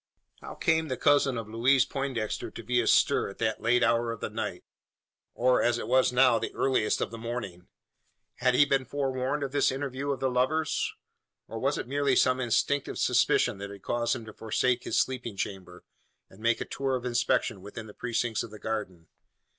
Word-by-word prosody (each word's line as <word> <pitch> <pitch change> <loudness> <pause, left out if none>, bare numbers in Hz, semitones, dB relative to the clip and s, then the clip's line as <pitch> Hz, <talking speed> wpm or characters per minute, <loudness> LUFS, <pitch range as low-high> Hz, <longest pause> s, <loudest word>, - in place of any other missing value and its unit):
How - - -9
came 160 -1 +1
the 130 -3 -3
cousin 140 -3 +3
of 115 -2 -5
Louise 125 +4 +3
Poindexter 135 -6 -3
to - - -10
be 125 +1 +1
astir 115 - +3
at 100 - -11
that 110 -1 -1
late 120 +2 +3
hour 115 0 +2
of 115 - -6
the - - -4
night, - - -4 0.7
or, 125 +1 +3
as 120 0 +2
it 115 - -5
was 130 +1 +3
now, 125 -2 +4
the - - -4
earliest 130 -5 +1
of - - -2
the 115 - -8
morning? 110 -7 -6 0.7
Had 125 0 +2
he 145 - +6
been 135 -2 +1
forewarned 135 +1 -2
of 135 - -3
this 145 -1 +2
interview 135 +1 -4
of 140 -2 -1
the 130 -1 0
lovers; 145 +5 0 0.6
or - - -6
was - - 0
it - - -5
merely 140 0 +1
some 130 +1 +3
instinctive 130 +3 0
suspicion - - +2
that 100 0 -6
had 100 -1 -11
caused 120 0 0
him 115 -3 -7
to 110 - -10
forsake 120 +3 0
his - - +1
sleeping 125 -5 -2
chamber, 90 -2 -6 0.5
and 95 - -16
make 115 +1 +1
a - - -3
tour 135 -1 -2
of 125 -1 -4
inspection 120 -5 0
within 105 +3 -8
the 105 - -12
precincts 120 -1 -1
of - - -6
the 105 - -11
garden? 105 -7 -4
125 Hz, 200 wpm, -28 LUFS, 110-135 Hz, 0.7 s, he